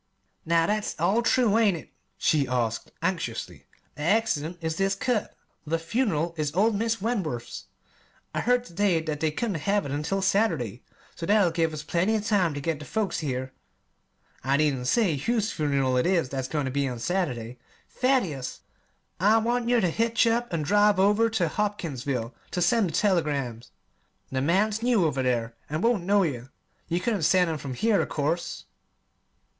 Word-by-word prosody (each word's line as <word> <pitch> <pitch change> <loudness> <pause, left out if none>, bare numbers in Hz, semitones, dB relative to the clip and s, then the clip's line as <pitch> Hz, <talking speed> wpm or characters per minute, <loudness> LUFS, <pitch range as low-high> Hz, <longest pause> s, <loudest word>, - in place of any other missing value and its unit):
"Now, 165 0 +3
that's 210 +3 -1
all 195 +8 +2
true, 230 -2 +3
ain't 205 -6 +3
it?" - - -12 0.3
she 145 -4 +2
asked 120 -3 -2
anxiously. 165 -10 -3 0.3
"The - - -10
'accident' 175 -3 +1
is 160 -1 -3
this 195 0 +1
cut. 225 +1 -1 0.3
The 160 +2 -1
'fun'ral' 170 - -1
is 150 0 -2
old 215 +4 +3
Mis' 225 +2 0
Wentworth's. 185 - -3 0.7
I - - -1
heard 245 +1 +2
ter 170 - -14
day 190 -2 +2
that 155 -2 -4
they 160 - +1
couldn't 185 0 -3
have 205 0 +2
it 140 - -4
until 155 +7 -1
Saturday, 160 - +1 0.3
so 165 - -5
that'll 205 -4 +4
give 165 -1 +1
us 150 -1 -6
plenty 175 +8 +1
of 215 -1 -2
time 190 -8 +2
ter - - -3
get 160 0 -2
the 150 - -8
folks 200 -5 -1
here. 130 -3 -3 0.9
I 135 +2 +2
needn't 140 -5 +1
say 190 - +2
whose 220 - 0
fun'ral 140 -4 0
it 125 - +1
is 175 -7 +1
that's 130 -1 -3
goin' 150 0 -2
ter 130 - -2
be 140 +1 0
on 125 -2 -4
Saturday, 125 -6 -2 0.3
Thaddeus! 195 - 0 0.6
I 210 +5 +5
want 235 +1 0
yer 245 -1 +4
ter 180 - +1
hitch 230 +4 +2
up 235 +1 +1
an' 165 -3 -1
drive 205 +3 +3
over 210 +4 +4
ter 210 -7 0
Hopkinsville 145 - -2 0.2
ter 180 - -2
send 195 +2 +3
the - - -7
telegrams. 145 - 0 0.6
The 130 0 -1
man's 205 +8 +1
new 235 -7 +3
over 140 -4 0
there, 120 -3 0 0.2
an' 155 +2 -2
won't 230 -7 +1
know 200 +1 +4
yer. 130 -6 -3 0.4
You 170 +1 0
couldn't 205 0 -1
send 180 +1 +3
'em 155 - -3
from 135 -3 -6
here, 220 - +2
of - - -3
course." 160 +4 -2
170 Hz, 180 wpm, -26 LUFS, 145-210 Hz, 0.9 s, I